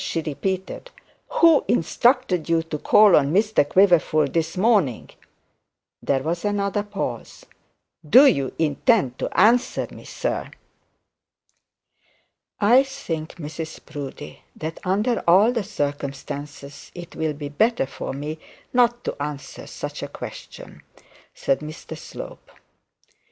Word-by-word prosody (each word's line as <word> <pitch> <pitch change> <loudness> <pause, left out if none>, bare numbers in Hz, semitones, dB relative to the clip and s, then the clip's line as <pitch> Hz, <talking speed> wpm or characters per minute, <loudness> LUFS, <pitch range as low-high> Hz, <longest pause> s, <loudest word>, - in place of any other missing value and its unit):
she 165 - -2
repeated. 185 - -4 0.4
'Who 335 - +5
instructed 190 - +1
you 165 -1 +2
to 160 -2 -5
call 210 +2 +6
on 140 0 +3
Mr 210 0 +3
Quiverful 175 -5 +4
this 165 +2 -2
morning?' 190 - +1 0.9
There 135 -1 0
was 170 +3 -2
another 205 -1 0
pause. 200 - -6 0.6
'Do 260 - +8
you 140 - +2
intend 155 - +1
to - - -2
answer 235 +6 +3
me, - - -12
sir?' - - -3 2.1
'I 235 +6 +6
think, 170 - -5
Mrs 160 0 -7
Proudie, 145 -1 -8
that 160 +1 -6
under 210 +6 +1
all 195 +7 +6
the 235 -4 -1
circumstances 145 -4 -6
it 175 -1 -10
will 160 -1 -1
be 145 0 -7
better 220 - +1
for 135 - -6
me 150 +3 -5 0.3
not 240 -1 +3
to - - -3
answer 145 -2 -6
such - - -6
a - - -4
question,' - - -10 0.5
said 135 - 0
Mr 155 +2 -8
Slope. - - -10
170 Hz, 120 wpm, -23 LUFS, 145-215 Hz, 2.1 s, Do